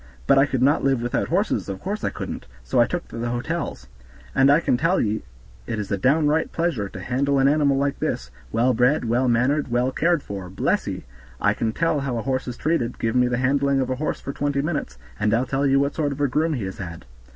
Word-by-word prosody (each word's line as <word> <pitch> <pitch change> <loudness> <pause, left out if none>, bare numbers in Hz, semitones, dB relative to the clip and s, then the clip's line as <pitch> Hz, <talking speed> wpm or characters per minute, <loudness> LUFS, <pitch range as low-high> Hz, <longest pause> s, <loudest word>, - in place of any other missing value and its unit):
But 135 - +5
I 140 - +4
could 130 -2 0
not 145 +3 +3
live 135 -2 +2
without 120 - -1
horses, 190 - 0
of 95 - -4
course 205 +3 -4
I - - +1
couldn't, - - -6 0.2
so - - +2
I - - +4
took - - -4
to - - -7
the 120 +1 -2
hotels. 120 - -3 0.5
And 135 +1 +4
I 150 - +6
can 160 - +1
tell 165 +9 +2
ye 110 0 0 0.5
it 115 - -2
is 105 -2 -4
a - - +2
downright 150 +7 +2
pleasure 155 - -1
to 95 - -9
handle 140 +7 0
an 135 0 +4
animal 140 -1 +3
like 140 0 0
this, - - -2 0.2
well 125 +3 +2
bred, 125 +4 +2
well 120 +3 +1
mannered, 125 +5 +2
well 125 +1 +1
cared 170 +1 +1
for; 95 -2 -6
bless 95 - 0
ye! - - -4 0.4
I - - +3
can 110 - -1
tell 160 +3 0
how 135 -3 -2
a 115 - -3
horse 130 -1 -1
is 120 -1 -5
treated. 145 -7 -1
Give 115 +1 -1
me 125 0 +4
the 125 0 0
handling 135 +2 +2
of 130 -1 -1
a 130 - -1
horse 155 +3 -2
for 140 - -6
twenty 140 -1 -1
minutes, 150 -2 -3 0.2
and 105 +1 +2
I'll 125 +3 +1
tell 135 +2 0
you 135 0 +4
what 140 +1 +1
sort 150 -3 -1
of 140 - -6
a 145 - +3
groom 155 +5 +1
he 125 -7 -3
has 95 0 -6
had. 85 -4 -7
135 Hz, 250 wpm, -23 LUFS, 120-145 Hz, 0.5 s, I